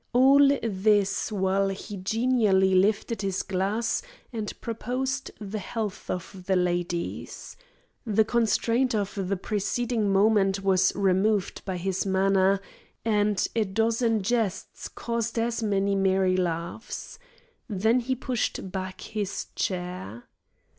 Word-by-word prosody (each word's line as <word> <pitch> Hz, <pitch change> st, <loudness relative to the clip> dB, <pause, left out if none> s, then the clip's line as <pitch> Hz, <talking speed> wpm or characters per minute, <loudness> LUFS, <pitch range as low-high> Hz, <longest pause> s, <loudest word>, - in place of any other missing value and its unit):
All 265 Hz, +3 st, +6 dB, 0.2 s
this, 205 Hz, -1 st, +1 dB
while 195 Hz, -1 st, +1 dB
he 200 Hz, +2 st, -6 dB
genially 200 Hz, -1 st, +2 dB
lifted 205 Hz, +3 st, +2 dB
his 195 Hz, -2 st, -1 dB
glass 195 Hz, +5 st, -1 dB, 0.3 s
and 220 Hz, -2 st, -3 dB
proposed 255 Hz, +4 st, -3 dB
the 210 Hz, 0 st, -5 dB
health 210 Hz, -1 st, -5 dB
of 180 Hz, +1 st, -5 dB
the 190 Hz, -, +3 dB
ladies. 175 Hz, -1 st, -2 dB, 0.5 s
The 220 Hz, -1 st, +2 dB
constraint 235 Hz, +2 st, +1 dB
of 200 Hz, -2 st, -1 dB
the 195 Hz, +1 st, 0 dB
preceding 215 Hz, +2 st, -1 dB
moment 195 Hz, -1 st, +3 dB
was 190 Hz, -1 st, +4 dB
removed 195 Hz, +1 st, +1 dB
by 190 Hz, -2 st, -3 dB
his 190 Hz, +1 st, -1 dB
manner, 195 Hz, 0 st, +3 dB, 0.5 s
and 210 Hz, -2 st, +2 dB
a 225 Hz, -, +3 dB
dozen 225 Hz, +2 st, +1 dB
jests 225 Hz, -3 st, -2 dB
caused 230 Hz, -1 st, -3 dB
as 230 Hz, 0 st, 0 dB
many 200 Hz, -2 st, +1 dB
merry 190 Hz, -1 st, +2 dB
laughs. 175 Hz, +5 st, -4 dB, 0.5 s
Then 220 Hz, +3 st, +2 dB
he 260 Hz, +2 st, -1 dB
pushed 245 Hz, -6 st, -2 dB
back 185 Hz, -1 st, -5 dB
his 205 Hz, -1 st, -4 dB
chair. 180 Hz, -, -4 dB
200 Hz, 120 wpm, -26 LUFS, 190-225 Hz, 0.5 s, All